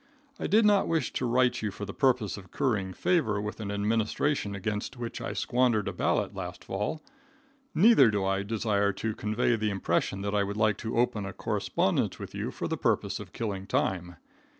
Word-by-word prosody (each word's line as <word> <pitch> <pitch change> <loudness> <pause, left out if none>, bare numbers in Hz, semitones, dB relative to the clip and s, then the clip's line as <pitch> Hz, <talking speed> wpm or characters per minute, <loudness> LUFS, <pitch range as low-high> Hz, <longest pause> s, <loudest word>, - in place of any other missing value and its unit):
I - - -2
did 215 +2 +4
not 205 -2 +4
wish 165 -5 0
to 125 - -1
write 125 0 +2
you 110 - -1
for 105 +1 -6
the 100 - -7
purpose 125 -7 +2
of 95 -3 -11
currying 100 -6 0
favor 110 - +1
with 105 +1 -5
an 105 -2 -4
administration 105 +3 0
against 105 +4 -3
which 120 -1 -5
I - - -3
squandered 120 -4 +1
a - - -2
ballot - - 0
last - - -6
fall. 105 +11 -3 0.7
Neither 180 - +7
do 100 -2 0
I 95 0 +1
desire 100 -1 0
to 110 +3 -3
convey 110 +3 +1
the 110 0 0
impression 95 0 0
that 100 0 -2
I 105 - +3
would 100 +1 -4
like 110 -2 +2
to 115 0 -3
open 115 -3 +1
a 95 - -6
correspondence - - 0
with - - -8
you - - -3
for - - -4
the - - -2
purpose - - 0
of - - -9
killing 100 -4 -4
time. 90 -2 -1
105 Hz, 195 wpm, -28 LUFS, 100-125 Hz, 0.7 s, Neither